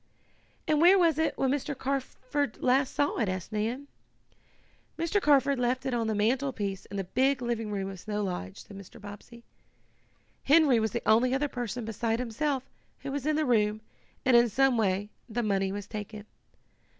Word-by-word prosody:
"And 305 Hz, -1 st, +2 dB
where 360 Hz, +3 st, +7 dB
was 330 Hz, -4 st, +3 dB
it 320 Hz, -, 0 dB
when 265 Hz, -1 st, +1 dB
Mr. 285 Hz, 0 st, -2 dB
Carford 270 Hz, -1 st, -2 dB
last 260 Hz, +2 st, +2 dB
saw 285 Hz, -, +1 dB
it?" 215 Hz, -5 st, +1 dB
asked 185 Hz, +2 st, -4 dB
Nan. 230 Hz, +6 st, -2 dB, 1.1 s
"Mr. 335 Hz, +5 st, 0 dB
Carford 280 Hz, -3 st, +3 dB
left 250 Hz, +1 st, 0 dB
it 265 Hz, -, -1 dB
on 230 Hz, -2 st, 0 dB
the 220 Hz, -, 0 dB
mantlepiece 215 Hz, -3 st, -1 dB
in 200 Hz, -, -7 dB
the 195 Hz, -, -1 dB
big 265 Hz, +8 st, +1 dB
living 235 Hz, -3 st, -2 dB
room 195 Hz, -2 st, -2 dB
of 195 Hz, -1 st, -7 dB
Snow 210 Hz, +2 st, -3 dB
Lodge," 135 Hz, -, -5 dB
said 200 Hz, -, -13 dB
Mr. 200 Hz, +3 st, -12 dB
Bobbsey. 210 Hz, +3 st, -11 dB, 1.0 s
"Henry 285 Hz, -4 st, +5 dB
was 220 Hz, 0 st, 0 dB
the -, -, -4 dB
only 250 Hz, +4 st, +4 dB
other 290 Hz, +2 st, 0 dB
person, 245 Hz, -3 st, -4 dB
beside 225 Hz, +1 st, -1 dB
himself, 255 Hz, +3 st, -2 dB, 0.4 s
who 275 Hz, -, -5 dB
was 285 Hz, 0 st, -3 dB
in 310 Hz, -, +2 dB
the 310 Hz, 0 st, +1 dB
room, 215 Hz, -3 st, +2 dB, 0.4 s
and 255 Hz, -2 st, +5 dB
in 235 Hz, 0 st, +6 dB
some 270 Hz, +3 st, +3 dB
way 205 Hz, -1 st, 0 dB, 0.2 s
the 235 Hz, +2 st, -2 dB
money 195 Hz, -2 st, 0 dB
was 205 Hz, 0 st, -5 dB
taken. 210 Hz, 0 st, -7 dB
240 Hz, 180 wpm, -28 LUFS, 210-275 Hz, 1.1 s, where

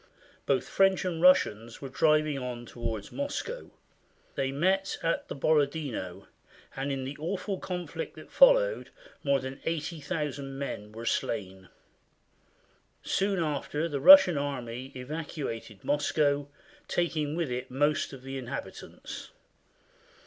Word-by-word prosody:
Both 135 Hz, -2 st, +1 dB
French 195 Hz, -1 st, +3 dB
and 170 Hz, -3 st, -2 dB
Russians 120 Hz, -, +4 dB
were 140 Hz, -, -6 dB
driving 155 Hz, +1 st, +2 dB
on 125 Hz, -2 st, -5 dB
toward 115 Hz, -3 st, -5 dB
Moscow. 295 Hz, +13 st, -4 dB, 0.6 s
They 135 Hz, -1 st, -1 dB
met 190 Hz, +7 st, +1 dB
at 165 Hz, -, 0 dB
the -, -, -5 dB
Borodino, 140 Hz, -, 0 dB, 0.5 s
and 135 Hz, +1 st, -2 dB
in 135 Hz, -1 st, -2 dB
the 135 Hz, +2 st, -5 dB
awful 185 Hz, +4 st, -3 dB
con 180 Hz, -1 st, -4 dB
flict 485 Hz, -, -6 dB
that -, -, -12 dB
followed -, -, +5 dB, 0.3 s
more 140 Hz, -1 st, +3 dB
than 130 Hz, +1 st, -6 dB
80,000 150 Hz, -4 st, -3 dB
men 105 Hz, -7 st, -5 dB
were 115 Hz, +2 st, -8 dB
slain. 95 Hz, -6 st, -2 dB, 1.3 s
Soon 195 Hz, 0 st, +1 dB
after 150 Hz, +1 st, -2 dB
the 145 Hz, -4 st, -3 dB
Russian 210 Hz, -, +9 dB
army 130 Hz, -2 st, -4 dB
evacuated 130 Hz, -, -5 dB
Moscow, 145 Hz, -1 st, +1 dB, 0.4 s
taking 155 Hz, -4 st, 0 dB
with 165 Hz, -6 st, -1 dB
it 125 Hz, +1 st, -3 dB
most 145 Hz, +3 st, +1 dB
of 135 Hz, -2 st, -10 dB
the 135 Hz, 0 st, -5 dB
inhabitants. 125 Hz, -2 st, -7 dB
145 Hz, 125 wpm, -29 LUFS, 130-170 Hz, 1.3 s, Russian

